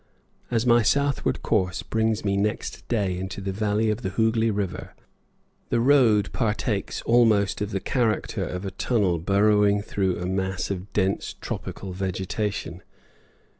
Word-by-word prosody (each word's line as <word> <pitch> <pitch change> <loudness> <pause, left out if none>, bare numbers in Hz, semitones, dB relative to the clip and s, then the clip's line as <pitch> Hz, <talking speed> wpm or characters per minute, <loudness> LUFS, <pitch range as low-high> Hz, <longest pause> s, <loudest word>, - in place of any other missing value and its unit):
As 115 -1 0
my 120 -1 +5
southward 140 +5 +1
course 90 0 0
brings 110 -1 0
me 100 -1 +1
next 105 +2 -2
day 100 -6 0
into 95 +1 -5
the 100 0 -3
valley 105 +2 +1
of 105 +3 -3
the 95 - -2
Hooghli 110 +2 +1
River, 100 -3 -4 0.7
the - - +1
road 120 -5 +4
partakes 110 -3 -1
almost 110 -5 +3
of 105 - -1
the 100 - -2
character 115 +1 -1
of 90 +2 -5
a 95 - -3
tunnel 95 -4 0
burrowing 100 +2 +3
through 95 -3 -1
a 90 - -4
mass 95 0 -2
of 95 +1 -5
dense 95 -1 0
tropical 95 -2 -6
vegetation. 95 0 -3
105 Hz, 145 wpm, -25 LUFS, 95-110 Hz, 0.7 s, my